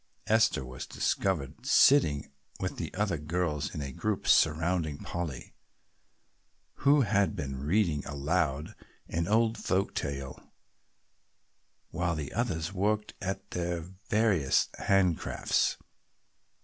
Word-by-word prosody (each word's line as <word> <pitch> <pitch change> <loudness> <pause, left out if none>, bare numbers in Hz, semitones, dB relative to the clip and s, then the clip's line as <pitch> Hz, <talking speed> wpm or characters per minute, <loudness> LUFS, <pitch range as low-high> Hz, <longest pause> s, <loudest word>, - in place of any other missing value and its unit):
Esther 110 - +3
was 65 0 -7
discovered 85 -9 -1
sitting 75 - +4 0.3
with - - -3
the - - -4
other 100 -5 0
girls 75 -2 -1
in 75 - -3
a 70 - -5
group 105 +8 -2
surrounding 80 -1 +3
Polly, 80 -7 -5 1.2
who 140 +1 +4
had 100 -4 +2
been 70 -2 -4
reading 80 -3 +1
aloud 75 0 -1 0.3
an 85 0 -2
old 110 +2 +2
folk 95 +1 0
tale 70 -2 -5 1.4
while 85 -1 -1
the 75 -3 -5
others 95 -7 -1
worked 105 +2 0
at 95 +1 -4
their 85 -1 -2 0.3
various 100 -11 +2
hand 95 -6 +3
crafts. - - 0
85 Hz, 110 wpm, -30 LUFS, 75-100 Hz, 1.4 s, sitting